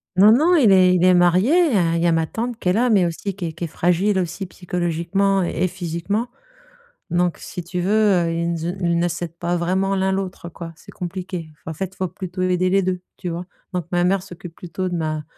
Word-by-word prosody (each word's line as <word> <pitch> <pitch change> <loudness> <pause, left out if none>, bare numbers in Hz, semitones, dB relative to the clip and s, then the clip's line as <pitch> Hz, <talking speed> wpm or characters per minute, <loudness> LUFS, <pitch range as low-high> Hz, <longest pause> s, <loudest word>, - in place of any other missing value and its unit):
Non 200 +4 +7
non, 315 +10 +5
il 250 -11 +5
est 185 -1 +6
il 180 - +2
est 185 - +6
marié, 180 - +4 0.4
il 165 - 0
y 175 - +3
a - - +4
ma 165 -1 +2
tante 235 +7 -4
qui 180 - -1
est - - +3
là, 240 +5 +2
mais 200 -5 +4
aussi 175 +3 -3
qui 190 -3 -5
est 165 - -4
qui 170 +2 -4
est - - -4
fragile 180 +5 +1
aussi, 185 +1 -2
psychologiquement 180 +2 0
et 175 +1 0
physiquement. 180 +6 -3 0.8
Donc, 175 0 +1
si 180 - -7
tu 180 +1 -3
veux, 185 +3 0 0.3
heu, 165 - -1
ils 170 +1 -1
nze 165 -1 -4 0.2
ils 170 -1 +1
ne 175 - +2
s'aident 170 -1 -5
pas 170 +1 -1
vraiment 190 +3 0
l'un 190 0 +1
l'autre, 190 -2 -4
quoi. 165 -1 -9
C'est - - -14
compliqué. 180 -2 -5
Enfin, 160 - -8
en - - -5
fait, 190 - -2
il - - -26
faut 185 - -1
plutôt 185 0 -6
aider 185 0 +2
les 195 +1 +3
2, 180 0 -1 0.2
tu 180 - -5
vois. 170 +1 -4 0.3
Donc 180 -3 -2
ma 175 0 +2
mère 190 0 +1
s'occupe 175 -3 -10
plutôt 185 +1 -4
de 175 - -3
ma 155 -2 -1
de - - -8
180 Hz, 240 wpm, -21 LUFS, 170-190 Hz, 0.8 s, Non